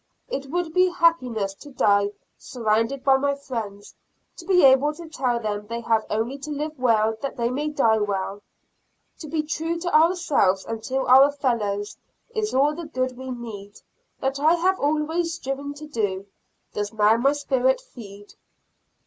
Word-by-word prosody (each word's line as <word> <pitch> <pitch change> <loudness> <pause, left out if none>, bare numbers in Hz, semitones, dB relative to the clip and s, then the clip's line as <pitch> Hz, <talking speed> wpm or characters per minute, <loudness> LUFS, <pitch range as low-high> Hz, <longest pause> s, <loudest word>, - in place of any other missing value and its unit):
It 275 0 -4
would 340 0 -2
be 365 0 +4
happiness 255 - +1
to 290 +9 -14
die 205 -6 +2 0.3
surrounded 230 +2 -1
by 270 -1 +5
my 280 +1 0
friends, 220 -7 -7 0.4
to 340 - -11
be 360 -5 +5
able 270 +3 +5
to 340 0 -10
tell 255 -6 -1
them 210 -2 -4
they 235 +1 -4
have 225 -1 +1
only 230 +6 -2
to 300 - -8
live 300 0 -4
well 225 -3 +2
that 275 0 -4
they 235 0 0
may 290 +4 -2
die 230 -7 +2
well. 200 -1 -2 0.8
To 310 - -8
be 310 0 -1
true 325 +2 -2
to 350 0 -2
ourselves 310 - +3
and 225 -1 -5
to 265 0 -1
our 265 +3 +7
fellows, 215 -8 -2 0.4
is 435 -2 -1
all 285 +3 +3
the 335 +2 -7
good 255 -4 -2
we 260 +1 -8
need. 220 -5 -8 0.4
That 270 +1 -2
I 315 +4 +4
have 370 +3 +1
always 320 +3 0
striven 280 -1 -5
to 300 +1 -9
do, 205 -9 -2 0.5
does 205 0 -3
now 215 0 +3
my 275 +4 +3
spirit 265 -3 +1
feed. 205 -3 -13
265 Hz, 170 wpm, -24 LUFS, 220-300 Hz, 0.8 s, our